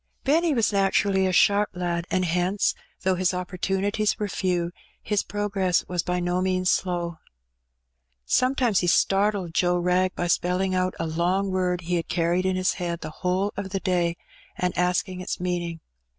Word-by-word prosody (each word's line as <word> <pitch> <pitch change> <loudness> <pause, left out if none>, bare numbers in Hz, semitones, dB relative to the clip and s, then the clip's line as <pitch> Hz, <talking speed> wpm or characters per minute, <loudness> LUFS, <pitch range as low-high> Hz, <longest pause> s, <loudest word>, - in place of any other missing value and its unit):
Benny 320 +4 +3
was 225 -3 +2
naturally 195 -1 +2
a - - +1
^harp 205 +3 +4
lad, 175 -1 -2
and 185 0 +1
hence, 180 +4 +1 0.3
though 190 0 +3
his 180 0 0
opportunities 195 +3 -1
were 210 -2 -2
few, 180 -3 -1 0.3
his 210 -2 0
progress 195 -3 0
was 180 -1 -1
by 180 +1 -1
no 175 +1 0
means 185 -1 +1
slow. 175 -3 -1 1.1
Sometimes 255 - +2
he 175 - -1
startled 195 -1 +2
Joe 175 +1 +2
Wrag 180 +1 +1
by 175 - -2
spelling 180 +2 +1
out 185 0 0
a 165 - -1
long 180 +5 0
word 180 -1 0
he 175 +1 -1
had 165 - -3
carried 175 +2 +1
in 185 - +1
his 185 0 +1
head 170 -1 -3
the - - -6
whole 185 +2 0
of 200 -1 -4
the 195 0 -2
day, 175 -2 0 0.4
and 180 0 -1
asking 180 +1 0
its 185 - -4
meaning. 175 -2 -3
185 Hz, 170 wpm, -25 LUFS, 175-195 Hz, 1.1 s, ^harp